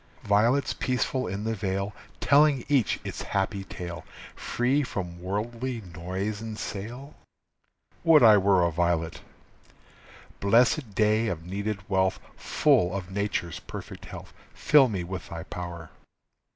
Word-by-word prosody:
Violets 115 Hz, +7 st, +2 dB
peaceful 130 Hz, 0 st, -1 dB
in 100 Hz, +3 st, -4 dB
the 115 Hz, +1 st, -1 dB
vale, 100 Hz, -1 st, -2 dB, 0.3 s
Telling 140 Hz, -1 st, +4 dB
each 140 Hz, -6 st, +2 dB
its -, -, -5 dB
happy 95 Hz, 0 st, -2 dB
tale, 85 Hz, -3 st, -7 dB, 0.3 s
Free 130 Hz, +4 st, 0 dB
from 90 Hz, -9 st, -5 dB
worldly 115 Hz, +6 st, -3 dB
noise 95 Hz, +5 st, -3 dB
and 110 Hz, -1 st, -6 dB
sale. 120 Hz, +10 st, -6 dB, 0.9 s
Would 160 Hz, -5 st, +6 dB
I 110 Hz, -2 st, +9 dB
were 95 Hz, -2 st, +4 dB
a 85 Hz, -, +1 dB
violet! 85 Hz, 0 st, 0 dB, 1.2 s
Blessed 115 Hz, +2 st, +3 dB
day 110 Hz, +2 st, +3 dB
of 85 Hz, -4 st, -4 dB
needed 100 Hz, +2 st, -4 dB
wealth, 95 Hz, -1 st, +1 dB, 0.2 s
Full 90 Hz, +2 st, +2 dB
of 95 Hz, -1 st, -5 dB
Nature's 100 Hz, -4 st, -2 dB
perfect -, -, -9 dB
health, -, -, -10 dB, 0.2 s
Fill 145 Hz, -3 st, +5 dB
me 95 Hz, -5 st, -2 dB
with 90 Hz, +1 st, -6 dB
thy 85 Hz, -1 st, -6 dB
power. 85 Hz, -2 st, -7 dB
100 Hz, 130 wpm, -27 LUFS, 90-120 Hz, 1.2 s, I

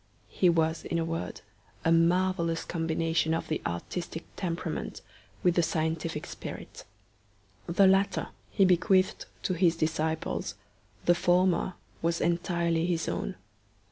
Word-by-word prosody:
He 180 Hz, -, +3 dB
was, 165 Hz, -1 st, +1 dB
in 170 Hz, -, -2 dB
a 165 Hz, -, 0 dB
word, 165 Hz, 0 st, -4 dB, 0.4 s
a 165 Hz, -, +4 dB
marvellous 170 Hz, 0 st, +2 dB
combination 165 Hz, -1 st, 0 dB
of -, -, -4 dB
the 155 Hz, -, -1 dB
artistic 165 Hz, -, -4 dB
temperament 175 Hz, -3 st, -3 dB, 0.4 s
with 180 Hz, -, +4 dB
the 175 Hz, -, +3 dB
scientific 160 Hz, -1 st, -1 dB
spirit. -, -, -8 dB, 0.8 s
The 180 Hz, +3 st, +4 dB
latter 195 Hz, +1 st, +3 dB, 0.2 s
he 195 Hz, -, +4 dB
bequeathed 185 Hz, +1 st, +3 dB, 0.2 s
to 185 Hz, -, 0 dB
his 170 Hz, -1 st, +3 dB
disciples; 160 Hz, -4 st, -1 dB, 0.5 s
the 175 Hz, -, +6 dB
former 180 Hz, 0 st, +2 dB, 0.3 s
was 165 Hz, 0 st, +1 dB
entirely 170 Hz, -1 st, +1 dB
his 165 Hz, -3 st, 0 dB
own. -, -, -2 dB
170 Hz, 125 wpm, -29 LUFS, 165-180 Hz, 0.8 s, the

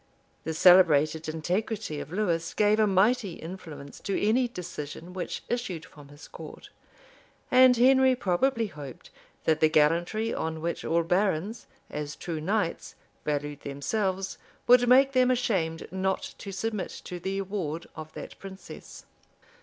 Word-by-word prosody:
[] -, -, -39 dB
The 160 Hz, 0 st, -3 dB
celebrated 160 Hz, -3 st, +5 dB
integrity 180 Hz, +2 st, -2 dB
of 145 Hz, +2 st, -8 dB
Lewis 175 Hz, -4 st, -1 dB
gave 210 Hz, +1 st, +3 dB
a 215 Hz, -, +4 dB
mighty 200 Hz, +1 st, +2 dB
influence 160 Hz, -5 st, -9 dB
to 195 Hz, -, -2 dB
any 240 Hz, +5 st, +2 dB
decision 175 Hz, -4 st, -7 dB
which 185 Hz, -1 st, -5 dB
issued 195 Hz, -10 st, -3 dB
from 145 Hz, -5 st, -15 dB
his 145 Hz, +1 st, -13 dB
court; -, -, -11 dB, 0.8 s
and 255 Hz, -1 st, +7 dB
Henry 260 Hz, +1 st, +5 dB
probably 230 Hz, +3 st, +1 dB
hoped, 145 Hz, -, -10 dB, 0.3 s
that 160 Hz, -1 st, +2 dB
the 155 Hz, -, +5 dB
gallantry 170 Hz, +9 st, +2 dB
on 160 Hz, 0 st, -3 dB
which 170 Hz, +2 st, -3 dB
all 170 Hz, +1 st, +1 dB
barons, 190 Hz, +4 st, 0 dB, 0.2 s
as 150 Hz, 0 st, -5 dB
true 165 Hz, -3 st, -5 dB
knights, 195 Hz, +1 st, -2 dB, 0.3 s
valued 145 Hz, -1 st, -2 dB
themselves, 190 Hz, +7 st, -2 dB, 0.3 s
would 245 Hz, 0 st, +6 dB
make 270 Hz, +2 st, +6 dB
them 255 Hz, -1 st, +3 dB
ashamed 190 Hz, -10 st, 0 dB
not 190 Hz, +1 st, -2 dB
to 200 Hz, -, -7 dB
submit 210 Hz, +1 st, -3 dB, 0.2 s
to 180 Hz, -, -6 dB
the 190 Hz, +3 st, -3 dB
award 185 Hz, -5 st, -3 dB
of 155 Hz, -1 st, -8 dB
that -, -, -9 dB
princess. 195 Hz, 0 st, -11 dB
185 Hz, 145 wpm, -27 LUFS, 160-215 Hz, 0.8 s, and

